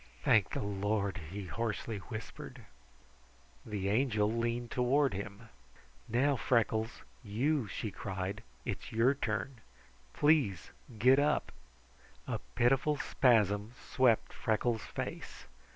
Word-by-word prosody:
"Thank 110 Hz, -4 st, +4 dB
the -, -, -3 dB
Lord!" 100 Hz, 0 st, -1 dB
he 100 Hz, +2 st, -6 dB
hoarsely 115 Hz, +1 st, -3 dB
whispered. 110 Hz, +2 st, -8 dB, 1.0 s
The 100 Hz, -3 st, -3 dB
Angel 110 Hz, -2 st, +2 dB
leaned 120 Hz, +1 st, -1 dB
toward 135 Hz, +2 st, +2 dB
him. 100 Hz, +3 st, -7 dB, 0.6 s
"Now, 135 Hz, +5 st, +3 dB
Freckles, 115 Hz, -2 st, 0 dB, 0.2 s
you!" 125 Hz, +5 st, 0 dB
she 105 Hz, +2 st, -4 dB
cried. 95 Hz, +1 st, -4 dB, 0.2 s
"It's -, -, -4 dB
your 115 Hz, +4 st, +4 dB
turn. 120 Hz, -1 st, -3 dB, 0.5 s
Please 140 Hz, -, +2 dB, 0.3 s
get 130 Hz, +5 st, +6 dB
up!" 145 Hz, +1 st, +1 dB, 0.7 s
A -, -, -2 dB, 0.2 s
pitiful 135 Hz, +5 st, +3 dB
spasm 110 Hz, -5 st, +2 dB
swept 125 Hz, -4 st, +2 dB
Freckles' 110 Hz, +1 st, 0 dB
face. -, -, -6 dB
115 Hz, 105 wpm, -33 LUFS, 105-125 Hz, 1.0 s, get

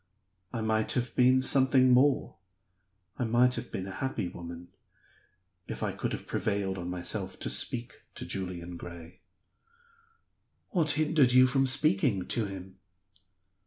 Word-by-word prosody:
I 115 Hz, -, -3 dB
might 110 Hz, 0 st, 0 dB
have 120 Hz, -1 st, -2 dB
been 130 Hz, +1 st, +4 dB
something 130 Hz, -1 st, +4 dB
more, 130 Hz, -5 st, +3 dB, 0.8 s
I -, -, +1 dB
might 120 Hz, +2 st, +3 dB
have -, -, -5 dB
been 95 Hz, -, -4 dB
a 95 Hz, -, -7 dB
happy 130 Hz, -3 st, -3 dB
woman, 85 Hz, 0 st, -9 dB, 1.0 s
if -, -, -5 dB
I -, -, 0 dB
could -, -, -4 dB
have -, -, -5 dB
prevailed 100 Hz, -2 st, -2 dB
on 90 Hz, 0 st, -5 dB
myself 95 Hz, +2 st, -4 dB
to -, -, -1 dB
speak 120 Hz, 0 st, -1 dB
to -, -, -7 dB
Julian 90 Hz, -2 st, -5 dB
Gray." 85 Hz, +1 st, -11 dB, 1.5 s
"What 165 Hz, -5 st, +1 dB
hindered 150 Hz, -5 st, +3 dB
you 130 Hz, 0 st, +7 dB
from 135 Hz, +1 st, +2 dB
speaking 125 Hz, -7 st, +2 dB
to 115 Hz, -, 0 dB
him?" 95 Hz, 0 st, -9 dB
110 Hz, 140 wpm, -29 LUFS, 95-130 Hz, 1.5 s, you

